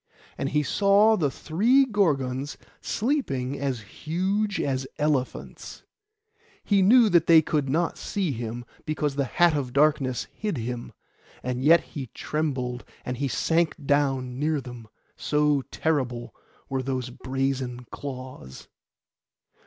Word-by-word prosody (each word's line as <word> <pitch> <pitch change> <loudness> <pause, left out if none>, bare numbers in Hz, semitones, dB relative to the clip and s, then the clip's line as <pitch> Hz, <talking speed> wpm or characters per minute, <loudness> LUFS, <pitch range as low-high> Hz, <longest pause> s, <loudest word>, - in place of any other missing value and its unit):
And 135 - -2
he 150 +1 +1
saw 205 +6 +4
the 155 -8 +1
three 230 - +3
Gorgons 145 - 0 0.2
sleeping 140 - -1
as 135 -4 -2
huge 190 - -2
as 130 -1 -1
elephants. 150 -4 -2 0.8
He 200 -2 +3
knew 230 +5 +6
that 170 -3 +4
they 160 -1 +7
could 145 -3 0
not 165 +5 0
see 190 -6 -1
him, 120 0 -5 0.2
because 150 -2 -2
the 140 -1 +1
hat 170 +4 +3
of 130 -4 -3
darkness 140 -3 +2
hid 210 -7 -3
him; 120 +1 -4 0.5
and 125 0 -2
yet 165 +3 +7
he 135 -4 -5
trembled 130 -6 -2 0.2
as 125 0 -3
he 140 +2 -1
sank 165 +5 +1
down 135 -3 +1
near 155 0 +1
them, 120 -4 -10 0.3
so 150 -1 +2
terrible 130 -7 -1 0.3
were 135 -1 -1
those 130 -1 -3
brazen 130 -1 -3
claws. 130 - -8
140 Hz, 130 wpm, -26 LUFS, 130-165 Hz, 0.8 s, they